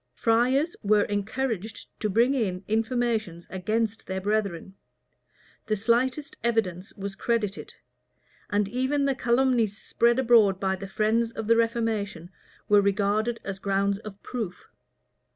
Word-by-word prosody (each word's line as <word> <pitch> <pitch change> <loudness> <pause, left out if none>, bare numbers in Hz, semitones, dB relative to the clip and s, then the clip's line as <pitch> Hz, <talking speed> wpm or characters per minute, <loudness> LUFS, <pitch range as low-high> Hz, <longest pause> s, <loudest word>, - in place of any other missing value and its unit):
Friars 255 +8 +2
were 210 0 +3
encouraged 220 +1 -3
to 215 - -1
bring 235 +7 +3
in 200 -8 -1
informations 225 -6 -1
against 215 +4 -2
their 190 0 -2
brethren; 200 -3 -2 0.9
the 215 - +1
slightest 255 +7 0
evidence 200 -6 -1
was 200 -1 -5
credited; 215 -4 -2 0.7
and 205 -1 +1
even 260 +5 0
the 275 - +2
calumnies 240 -4 +1
spread 235 +2 +1
abroad 225 -7 +4
by 190 -1 0
the 195 +1 -7
friends 225 +3 +1
of 220 - -5
the 230 +2 +4
reformation, 220 -6 -1 0.4
were 205 -1 +6
regarded 205 +3 +1
as 195 -1 -5
grounds 200 0 0
of 210 -2 -10
proof. 215 -8 -5
215 Hz, 130 wpm, -26 LUFS, 200-235 Hz, 0.9 s, were